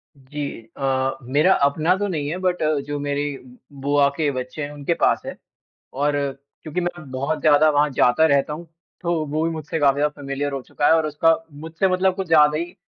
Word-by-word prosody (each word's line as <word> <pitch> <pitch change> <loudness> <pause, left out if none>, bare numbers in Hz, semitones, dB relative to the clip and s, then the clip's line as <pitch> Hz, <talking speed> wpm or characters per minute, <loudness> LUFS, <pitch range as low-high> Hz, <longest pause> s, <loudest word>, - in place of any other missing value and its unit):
जी 140 +2 -7 0.3
अ, 135 -1 0
मेरा 145 +9 +3
अपना 155 +6 +2
तो 205 0 -1
नहीं 150 -6 -3
है, 175 - -3
बट 180 -2 -1 0.2
जो 145 0 -3
मेरी 145 0 -2 0.4
बुआ 140 0 +3
के 150 -3 +1
बच्चे 130 +3 -5
हैं, 145 - -5
उनके 145 +3 -2
पास - - +3
है - - -6 0.6
और 145 +2 0 0.5
क्योंकि 155 +3 -3
मैं 175 -5 -5
बहुत 140 +4 -2
ज़्यादा 155 0 +5
वहाँ 145 0 +3
जाता 125 +6 +3
रहता 140 0 +2
हूँ, 165 +3 -7 0.3
तो 175 0 -1
वो 155 +3 -1
भी 165 - 0
मुझसे 160 0 -4
काफ़ी 140 -2 +4
ज़्यादा 150 0 -1
फ़ैमिलियर 140 +1 -3
हो 135 - -3
चुका 145 - -1
है - - +6
और 160 -1 +3
उसका 165 +2 +3 0.3
मुझसे 165 +4 0
मतलब 185 0 +2
कुछ 190 -1 -4
ज़्यादा 150 -2 +5
ही 175 +2 -5
150 Hz, 200 wpm, -22 LUFS, 140-165 Hz, 0.6 s, है